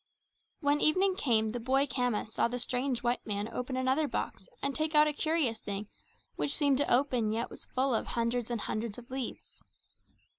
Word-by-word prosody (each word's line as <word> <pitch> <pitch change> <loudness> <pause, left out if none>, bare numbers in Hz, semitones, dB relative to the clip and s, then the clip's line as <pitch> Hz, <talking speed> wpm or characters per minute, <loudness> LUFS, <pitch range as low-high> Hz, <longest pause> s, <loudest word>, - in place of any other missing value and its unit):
When 290 0 +2
evening 370 +4 +4
came 225 - +2
the 240 +3 -3
boy 265 +4 +2
Khama 250 -4 0
saw 220 - +1
the 245 +1 -3
strange 250 +1 -1
white 240 0 0
man 205 -1 -2
open 250 +3 -4
another 260 +4 +2
box - - -4
and 280 - -1
take 310 +1 -1
out 300 0 +7
a 300 - 0
curious 300 -7 0
thing 205 +1 -5 0.5
which 285 - +1
seemed 280 -3 +3
to 285 - +1
open 245 -4 +3
yet 230 +2 -2
was - - -8
full 260 0 0
of 225 - 0
hundreds 235 0 -1
and 235 -3 -2
hundreds 215 -1 -3
of 245 +1 -12
leaves. 265 -2 -6
250 Hz, 190 wpm, -31 LUFS, 230-285 Hz, 0.5 s, out